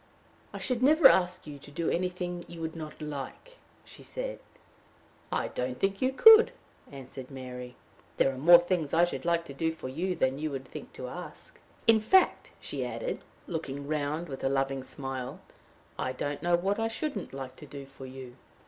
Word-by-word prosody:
"I - - -6
should 250 -2 -1
never 300 +2 +8
ask 180 0 +2
you 145 -2 -8
to 140 - -13
do 160 +3 -3
anything 180 0 -1
you 170 - -10
would 160 0 -4
not 155 -2 -7
like," 150 - -7 0.3
she - - -12
said. - - -5 0.9
"I - - 0
don't 125 0 -3
think 195 0 0
you 260 0 +3
could," 445 - +9 0.4
answered 130 -1 -9
Mary. 125 -2 -8 0.4
"There 135 - +3
are - - -8
more 170 +5 +9
things 175 -4 -1
I 170 +1 +6
should 175 - -5
like 170 -1 +2
to 140 - -8
do 160 +4 0
for 160 -5 -7
you 180 +7 -2
than 130 -2 +1
you 155 +1 -1
would 135 -2 -5
think - - -9
to 125 - -6
ask. 175 +7 -9 0.3
In 225 -1 +6
fact," 380 - +4
she - - -4
added, - - -4 0.2
looking 140 -4 -4
round 155 +2 -1
with 135 -3 -7
a 135 - +2
loving 135 0 0
smile, 130 -1 -5 0.6
"I 130 - -1
don't 145 +2 -3
know 175 +1 +3
what 195 +5 0
I 225 - +1
shouldn't 225 - -3
like 130 -1 -7
to 150 - -11
do 140 -1 -8
for 135 -1 -11
you." 130 -1 -10
155 Hz, 190 wpm, -29 LUFS, 135-180 Hz, 0.9 s, could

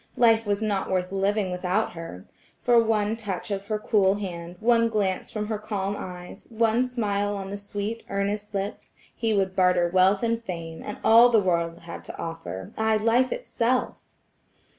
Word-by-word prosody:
Life 225 -2 +4
was 205 +1 0
not 205 -3 -1
worth 185 -1 -1
living 195 0 0
without 180 +4 0
her. 165 - -9 0.4
For 240 -1 +5
one 215 -1 +1
touch 205 -3 -5
of 200 0 -3
her 215 -1 0
cool 200 -2 +2
hand, 175 -4 -6
one 230 0 +3
glance 200 -4 -1
from 210 -1 -3
her 215 -1 -3
calm 205 -2 -3
eyes, 180 -2 -9
one 230 +2 +2
smile 205 -4 -1
on 195 0 -6
the 200 - -4
sweet, 205 +3 -4
earnest 205 +1 -2
lips, 195 +1 -4 0.2
he 225 -2 -1
would 190 -2 +1
barter 180 -2 +3
wealth 185 +3 +3
and 230 0 0
fame, 165 -5 -6
and 210 - -6
all 230 +2 +7
the 230 -2 +5
world 170 -3 0
had 170 0 -8
to - - -9
offer–aye 165 - -2
life 230 +4 +2
itself! 255 - -2
205 Hz, 170 wpm, -25 LUFS, 185-220 Hz, 0.4 s, all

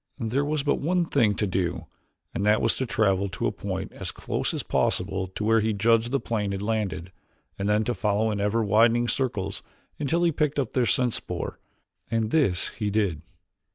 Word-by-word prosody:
There 125 +3 0
was 150 -1 -1
but 145 - +1
one 175 +3 +1
thing 115 -10 +2
to 105 - 0
do 90 -3 -1 0.5
and - - -2
that 105 +1 +4
was 115 - +2
to 130 - -2
travel 100 -3 +1
to 95 - -3
a - - +2
point - - -4
as - - -4
close - - -2
as - - -3
possible 95 0 0
to 95 +3 -6
where 115 +1 +4
he 110 0 +1
judged 115 +3 +2
the 140 - +2
plane 105 -5 -2
had 100 - -3
landed, 105 -5 -2 0.5
and 100 +1 0
then 105 +1 +3
to 120 - -1
follow 110 0 +1
in 100 -1 -2
ever 105 +3 +1
widening 115 +3 +4
circles 120 -8 -2 0.4
until 160 +4 +1
he 170 - +4
picked 150 -1 0
up 135 -5 0
their 125 -2 +2
scent 125 -3 +2
spoor. - - -4 0.5
And 115 -1 0
this 130 - +2
he 105 -3 -3
did. 100 -7 0
110 Hz, 200 wpm, -26 LUFS, 100-125 Hz, 0.5 s, that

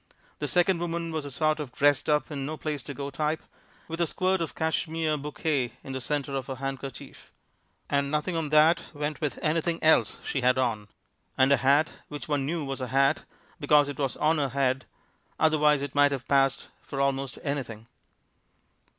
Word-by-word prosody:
This - - -1
second 180 0 +3
woman 170 -1 -3
was 155 -2 -3
a - - -5
sort 155 +3 +1
of 145 -5 -5
dressed 145 0 +2
up 150 +1 +1
and 140 -2 -3
no 155 +3 -4
place 150 -3 -3
to 145 - -5
go 140 +2 -5
type, 155 +3 -1 0.4
with 165 +1 -4
a 170 - +2
squirt 185 +3 0
of 165 - -4
Cashmere 160 0 0
Bouquet 145 -3 -2
in 135 - -7
the 130 - -3
center 140 +2 -2
of 135 - -3
her 135 - -4
handkerchief. 135 -1 -7 0.6
And 140 0 +1
nothing 150 +4 -1
on 160 -2 -1
that 155 +3 +5
went 150 +1 -3
with 150 -3 -2
anything 165 +2 +1
else 160 0 +4
she 135 - -1
had 125 +1 +3
on. 115 -5 0 0.5
And 130 +1 +4
a 140 - +6
hat 140 +5 +3
which 145 +3 -7
one 145 -3 0
knew 160 -1 -2
was 135 -1 -4
a 130 - -2
hat, 135 +4 +2 0.3
because 145 -1 +4
it 145 - -7
was 135 -3 -1
on 155 +1 +2
her 140 -2 0
head, 130 0 0 0.5
otherwise 150 -2 +4
it 140 - -5
might 145 0 +5
have 130 -2 -5
passed 135 -1 +2
for 135 - -6
almost 135 0 0
anything. 130 -7 -4
145 Hz, 195 wpm, -27 LUFS, 135-155 Hz, 0.6 s, a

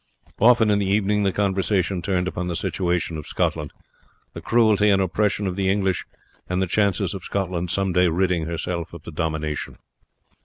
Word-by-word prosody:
Often 115 -1 +5
in 105 - +3
the 100 - -1
evening 105 +1 +2
the 100 -1 +2
conversation 95 -2 0
turned 90 +1 0
upon 90 -1 -3
the 85 - -2
situation 85 -2 -1
of 75 - -9
Scotland, - - -1 0.6
the - - -7
cruelty 110 -3 +3
and 100 -1 +4
oppression 100 +3 0
of 90 -2 -2
the 95 -1 0
English, 95 -2 0 0.4
and 90 0 0
the 95 - +2
chances 100 +2 +1
of 95 - -6
Scotland 90 -3 -2
some 95 0 0
day 90 0 +4
ridding 85 -1 0
herself 85 0 -4
of 80 - -11
the 85 - -8
domination. 80 -2 -3
95 Hz, 180 wpm, -23 LUFS, 85-100 Hz, 0.6 s, Often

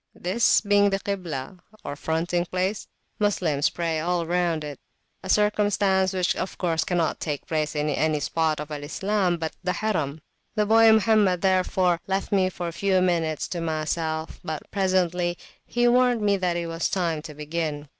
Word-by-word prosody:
This 190 +7 +2
being 205 -1 +4
the 195 0 -1
Kiblah, 180 -5 -5 0.2
or 145 - -5
fronting 165 +4 -1
place, 185 +4 -2 0.3
Moslems 175 -9 +1
pray 165 -2 -2
all 175 +1 0
around 170 -2 0
it; 145 -4 -7 0.4
a 190 - -8
circumstance 205 -2 +2
which 185 -1 0
of - - -4
course 165 -3 0
cannot 175 -3 0
take 145 -3 -4
place 155 -1 -2
in 150 0 0
any 155 +1 +1
spot 160 0 0
of 150 0 -6
Al 145 -1 -5
Islam 185 +3 0
but 160 -1 -4
the 180 0 0
Harim. 160 -9 -2 0.4
The 210 -1 +2
boy 225 +1 +6
Mohammed, 210 -4 +3
therefore, 185 -2 +2
left 195 0 -2
me 190 -2 +3
for 175 -1 -5
a 170 - -5
few 190 +1 +1
minutes 165 -4 0
to 175 - -3
myself; 160 0 -2
but 155 -1 -4
presently 180 -3 +1 0.3
he 240 0 +2
warned 245 -1 +3
me 205 -1 +3
that 180 -3 0
it 170 - -2
was 165 0 -2
time 170 -5 -1
to 150 -1 -10
begin. 150 -1 -3
175 Hz, 175 wpm, -25 LUFS, 160-195 Hz, 0.4 s, boy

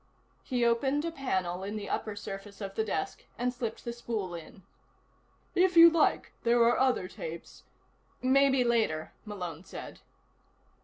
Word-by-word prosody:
He 245 -3 0
opened 265 +6 +2
a 335 - -2
panel 190 - -2
in 205 +2 -4
the 205 -2 -5
upper 215 -2 -2
surface 200 0 -8
of 195 -2 -5
the 220 - 0
desk, 195 -7 -3
and 245 +1 0
slipped 235 -3 -5
the 235 - -3
spool 220 -6 -4
in. 170 +3 -10 0.9
"If 365 -1 +3
you 335 0 +11
like, 330 -1 +2
there 240 0 +3
are 235 +1 +4
other 255 -8 +2
tapes 165 -2 -8 0.3
" - - -38 0.3
"Maybe 270 0 +4
later," 225 -10 0
Malone 180 -6 -6
said. 190 - -9
230 Hz, 155 wpm, -30 LUFS, 195-255 Hz, 0.9 s, you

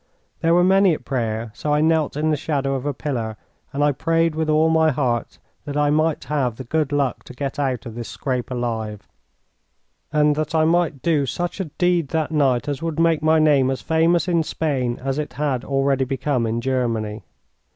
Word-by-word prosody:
There 165 +1 +3
were 175 - +5
many 190 -2 +4
at - - -12
prayer, 115 -4 -2
so 150 - -3
I - - +2
knelt 160 -2 +1
in 155 +1 +1
the - - +2
shadow 140 -2 -1
of 135 +1 -3
a 145 - 0
pillar, 115 -8 -3 0.3
and 145 +1 -1
I 145 - +4
prayed 165 +3 +1
with 160 0 -1
all 155 +1 +4
my 160 0 +4
heart 125 -5 -1 0.3
that 145 -1 -4
I 145 0 +2
might 155 +1 +1
have 135 -6 -1
the 130 - -7
good 150 +3 -1
luck 140 -3 0
to - - -10
get 140 +2 -4
out 130 -3 -1
of 115 - -7
this 115 0 -6
scrape 125 -3 -3
alive, 110 -4 -4 1.0
and 150 -1 +3
that 155 +1 -2
I 155 0 +4
might 165 -4 +1
do 150 -5 +2
such 175 +7 -3
a 190 - -1
deed 175 0 0
that 160 +1 -1
night 135 -5 +2
as 145 -2 -3
would 165 -1 -3
make 165 -2 +3
my 160 +1 +4
name 145 -4 +4
as 135 - -3
famous 165 +1 +2
in 170 -2 +2
Spain 135 -6 -1
as 135 +2 -1
it 150 - -4
had 140 -4 -1
already 135 -1 +1
become 130 -2 -1
in 115 +1 -1
Germany. 115 -4 -1
145 Hz, 205 wpm, -22 LUFS, 130-160 Hz, 1.0 s, were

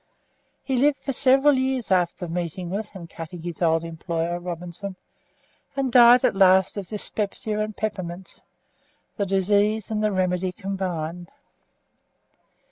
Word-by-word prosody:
He 265 -2 -1
lived 280 +2 +3
for 275 - -2
several 270 +3 +5
years 260 -4 -1
after 180 -1 +1
meeting 175 +1 -4
with 210 +2 -3
and 170 -3 -8
cutting 165 +1 -9
his 175 -1 -6
old 165 -1 +2
employer, 165 +1 -3
Robinson, 180 +2 -6 0.8
and 270 -2 -1
died 240 0 +7
at - - +2
last 190 -1 +5
of 200 -3 -5
dyspepsia 210 +1 -3
and 215 0 -3
peppermints, 190 -4 -5 0.8
the 200 -2 -1
disease 205 +3 +1
and 215 -1 -1
the 215 - +2
remedy 185 -1 0
combined. 180 -4 -4
190 Hz, 130 wpm, -24 LUFS, 175-215 Hz, 0.8 s, died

